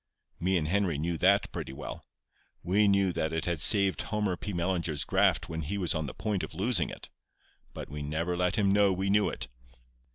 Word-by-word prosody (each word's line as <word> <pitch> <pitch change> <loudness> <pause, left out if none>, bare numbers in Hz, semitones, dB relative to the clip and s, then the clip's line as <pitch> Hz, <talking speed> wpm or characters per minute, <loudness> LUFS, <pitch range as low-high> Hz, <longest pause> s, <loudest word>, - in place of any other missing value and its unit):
"Me 95 +2 +1
and 75 -2 -1
Henry 95 -3 +1
knew 85 +3 -2
that 100 +5 +3
pretty - - -5
well. 65 - -8 0.6
We 100 +4 +3
knew 100 -2 +3
that 80 -1 -1
it 80 0 -2
had 85 -4 -1
saved 100 +1 +4
Homer 105 -4 -1
P. 105 - -6
Mellinger's 85 -4 -1
graft - - +2
when 80 0 -4
he 80 +7 -3
was 90 -4 0
on 80 -2 -2
the 65 - -8
point 105 -4 -2
of - - -7
losing 100 0 +1
it; - - -10 0.6
but - - -8
we 75 +2 -7
never 80 +4 -2
let 90 0 0
him 100 -2 +2
know 100 -1 +4
we 95 +1 -1
knew 105 0 +3
it. - - -5
90 Hz, 205 wpm, -29 LUFS, 80-100 Hz, 0.6 s, saved